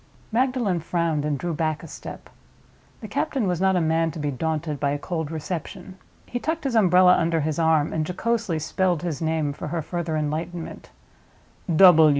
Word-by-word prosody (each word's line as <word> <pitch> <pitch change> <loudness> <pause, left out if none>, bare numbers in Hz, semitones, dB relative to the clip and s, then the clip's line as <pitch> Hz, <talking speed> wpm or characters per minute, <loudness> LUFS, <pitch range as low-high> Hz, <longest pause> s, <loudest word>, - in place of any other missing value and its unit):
Magdalen 240 -6 +1
frowned, 165 -2 -1
and 150 -2 0
drew 175 +3 -3
back 155 -1 -1
a - - -8
step. - - -9 0.7
The - - -6
captain 260 -6 -1
was 180 -1 -1
not 190 0 +3
a - - +3
man 165 0 +2
to 160 - -8
be 145 -2 -2
daunted 155 +1 -2
by 140 - +1
a 145 - 0
cold 160 0 -3
reception. 180 +4 -6 0.3
He 245 - -4
tucked 320 +4 -2
his 270 -3 -1
umbrella 180 -4 +6
under 165 -1 +1
his 155 +1 -1
arm 160 -2 +2
and 160 - 0
jocosely 200 +1 -1
spelled 175 +2 0
his 170 -4 -3
name 160 -2 0
for 150 - -6
her 160 +1 -2
further 170 -1 -2
enlightenment. 160 +3 -4
165 Hz, 175 wpm, -24 LUFS, 155-185 Hz, 0.7 s, umbrella